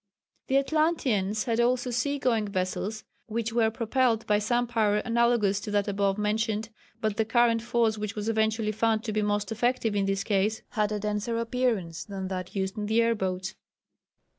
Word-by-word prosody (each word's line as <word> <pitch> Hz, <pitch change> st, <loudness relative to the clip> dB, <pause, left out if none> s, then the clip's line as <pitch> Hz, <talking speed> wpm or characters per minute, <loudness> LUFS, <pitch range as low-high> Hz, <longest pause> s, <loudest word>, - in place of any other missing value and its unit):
The 270 Hz, -, +3 dB
Atlanteans 265 Hz, -, +1 dB
had 235 Hz, -2 st, -1 dB
also 245 Hz, +1 st, +2 dB
sea 280 Hz, +4 st, 0 dB
going 230 Hz, -6 st, +1 dB
vessels 200 Hz, +3 st, -3 dB, 0.2 s
which 230 Hz, 0 st, -2 dB
were 230 Hz, -2 st, +3 dB
propelled 230 Hz, 0 st, +1 dB
by 210 Hz, -1 st, +3 dB
some 240 Hz, +3 st, +1 dB
power 220 Hz, -3 st, +1 dB
analogous 230 Hz, -3 st, +2 dB
to 210 Hz, -, -7 dB
that 205 Hz, -1 st, +1 dB
above 200 Hz, -1 st, 0 dB
mentioned, 215 Hz, +1 st, -1 dB, 0.3 s
but 215 Hz, -2 st, -1 dB
the 220 Hz, -, +3 dB
current 230 Hz, 0 st, +3 dB
force 230 Hz, -2 st, +1 dB
which 210 Hz, 0 st, -4 dB
was 210 Hz, 0 st, -4 dB
eventually 220 Hz, -1 st, +1 dB
found 220 Hz, 0 st, +1 dB
to 220 Hz, -3 st, -3 dB
be 215 Hz, -, +1 dB
most 205 Hz, +1 st, -1 dB
effective 230 Hz, -1 st, 0 dB
in 200 Hz, -1 st, +1 dB
this 195 Hz, 0 st, 0 dB
case 210 Hz, +1 st, 0 dB
had 210 Hz, -1 st, 0 dB
a 210 Hz, -, -1 dB
denser 210 Hz, +3 st, -2 dB
appearance 230 Hz, -8 st, -1 dB
than 190 Hz, -2 st, -5 dB
that 185 Hz, 0 st, -5 dB
used 190 Hz, +2 st, -2 dB
in 210 Hz, -, -2 dB
the 220 Hz, +2 st, +2 dB
air 230 Hz, 0 st, +3 dB
boats. 190 Hz, -2 st, -3 dB
220 Hz, 185 wpm, -27 LUFS, 205-235 Hz, 0.3 s, The